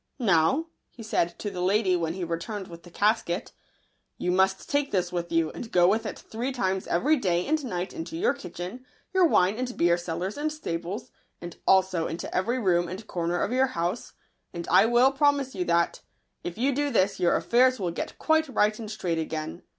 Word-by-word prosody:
" - - -48
Now," 195 - +3 0.2
he 230 - -12
said 170 -5 0
to 205 - -4
the 180 - -5
lady, 190 0 +2
when 165 -1 -1
he 190 - -4
returned 180 +4 -4
with 170 0 -10
the 175 - -14
casket, 205 -2 0 0.3
" - - -46
you 180 - -1
must 190 +1 +2
take 285 -1 0
this 180 -2 0
with 175 -1 -3
you, 165 -1 +1
and 230 - -8
go 175 -1 +5
with 220 +3 +1
it - - -6
three 240 +4 -4
times 190 -7 -1
every 295 - +2
day 180 -7 0
and 310 0 0
night 185 -7 -3
into 325 0 -6
your 420 +8 +2
kitchen, 185 +9 -7 0.3
your 375 -2 +5
wine 195 - +2
and 250 -1 -3
beer 170 0 +3
cellars 175 - -4
and 305 +1 -1
stables, 180 - -5 0.3
and 175 -1 -9
also 190 -3 +3
into 165 - -5
every 235 +7 +1
room 175 -7 +2
and 190 +5 -7
corner 175 -2 -1
of - - -2
your 260 +1 +3
house; 175 +7 -2 0.4
and 170 -1 -6
I 195 +4 +6
will 240 +3 +5
promise 280 -1 +2
you 185 -3 -2
that, 170 0 +1 0.4
if 175 +2 -5
you 270 +4 +1
do 290 +2 0
this, 200 -7 +1
your 175 -1 +3
affairs 255 +1 +3
will 180 -3 -1
get - - -5
quite 315 -1 +2
right 215 -4 +1
and 220 -2 -6
straight 180 -6 -2
again. 160 +1 -4
190 Hz, 210 wpm, -27 LUFS, 175-250 Hz, 0.4 s, I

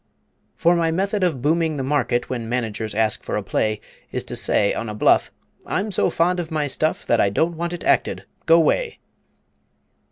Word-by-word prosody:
For 170 +1 +3
my 165 -1 +1
method 195 +4 0
of 150 -9 0
booming 160 0 +1
the 135 - -2
market 130 -3 0
When 120 -3 -4
Managers 110 -3 -3
ask 110 -1 +1
for - - -3
a - - -3
play 110 -1 -1 0.3
Is - - -3
to - - -6
say 100 - +2
on 115 - -4
a 105 - -5
bluff, - - +3 0.3
"I'm 205 +2 -2
so - - +1
fond 180 +2 +1
of 165 -2 -4
my 155 -2 -1
stuff 155 +2 -1
That 120 - +3
I 100 - +3
don't 165 +12 0
want 170 +1 -3
it 175 - -6
acted - - +1 0.2
go 165 +1 +7
'way!" 450 - +1
155 Hz, 195 wpm, -22 LUFS, 115-170 Hz, 0.3 s, go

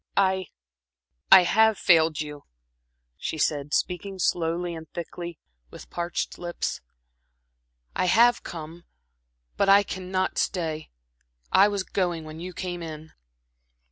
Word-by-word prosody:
"I 190 -2 +2 0.8
I 190 - +10
have 220 +3 +4
failed 160 -3 +4
you," 150 -1 -8 0.7
she 160 - -4
said, 145 -1 0
speaking 190 +4 -1
slowly 170 0 0
and 160 -2 -9
thickly, 170 0 -7 0.3
with - - -13
parched 175 0 -3
lips. 175 -1 -3 1.1
"I - - +1
have 235 +6 +5
come, 165 +1 -9 0.7
but 200 - +2
I 200 +1 +7
cannot 185 -1 -2
stay. 160 -4 -2 0.6
I 195 +2 +6
was 200 -2 -1
going 175 -4 -1
when 155 0 -9
you 180 +2 -6
came 180 -1 -5
in." 160 -1 -8
175 Hz, 120 wpm, -26 LUFS, 160-190 Hz, 1.1 s, I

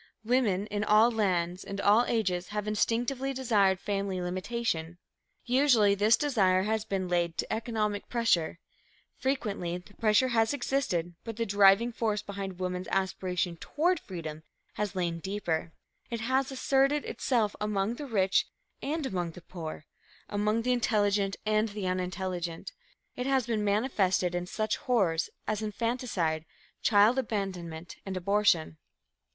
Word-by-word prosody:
Women 220 -5 +2
in 205 -1 -2
all 215 +3 +5
lands 180 -5 0
and 200 0 -6
all 210 +4 +5
ages 185 -6 0
have 210 0 -4
instinctively 245 +5 0
desired 205 -7 +2
family 195 -2 -2
limitation. 180 -2 -2 0.5
Usually 245 -5 +4
this 210 +3 +4
desire 195 -10 +2
has 220 +1 0
been 195 -3 -2
laid 175 -1 0
to - - -2
economic 215 -2 -2
pressure. 230 -10 +1 0.6
Frequently 205 -10 -1
the 180 +3 -15
pressure 220 +4 +3
has 225 +2 +2
existed, 245 -11 -1
but 225 -2 -6
the 230 - 0
driving 200 +3 +5
force 215 -3 -1
behind 195 -2 -6
woman's 180 0 -3
aspiration 185 -2 -1
toward 340 - 0
freedom 160 -4 -7 0.3
has 210 -2 -3
lain 170 -2 -1
deeper. 170 -4 -2 0.4
It 235 -1 -3
has 260 +3 +1
asserted 275 +2 +2
itself 225 -6 0
among 210 +2 -1
the 290 - -6
rich 195 -5 +2 0.3
and 305 +1 -2
among 175 -8 -2
the 180 - -11
poor, 160 -4 -7 0.4
among 210 +2 0
the 250 - +1
intelligent 205 -4 +1
and 215 +1 +2
the 205 -1 -5
unintelligent. 180 -2 -3 0.4
It 250 +1 -3
has 265 -3 +2
been 225 -3 -1
manifested 200 -4 +1
in 175 0 -2
such 215 +3 -1
horrors 195 - +1 0.2
as 215 0 -1
infanticide, 210 -8 -1 0.4
child 215 +4 +5
abandonment 180 -8 -4
and 190 -1 -4
abortion. 180 -4 +2
205 Hz, 140 wpm, -29 LUFS, 185-230 Hz, 0.6 s, all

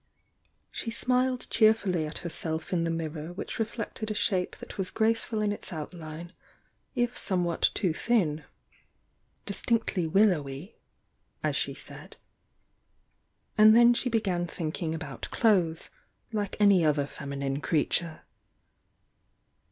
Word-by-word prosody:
.She 230 - -3
smiled 250 +2 +1
cheerfully 200 -7 +3
at 150 - -5
herself 160 0 -3
in 170 -2 +1
the - - 0
mirror 160 -1 -4
which 185 - -6
reflected 225 -1 -3
a 215 - -2
shape 195 -3 0
that - - -10
was 190 -2 -1
graceful 225 0 +1
in 205 - +1
its 205 - -6
outline 165 +1 -7 0.6
if 245 0 0
some 180 -3 0
i.'hat 170 - +2
too 180 -5 +1
thin 165 -8 +1 0.5
— - - -44
"distinctly 205 -4 0
willowy" 160 -3 +1 0.7
as - - 0
she - - -1
said - - -11 0.7
— - - -44
and 215 +1 +9
then 240 +1 +7
she 250 +1 0
began 190 -7 0
thinking 160 -1 -3
about 150 -6 -6
clothes, 180 -8 +2 0.4
like 205 -2 -2
any 200 -4 +6
other 150 -2 +2
feminine 140 0 -4
creature. 160 +1 0
180 Hz, 130 wpm, -28 LUFS, 160-215 Hz, 0.7 s, and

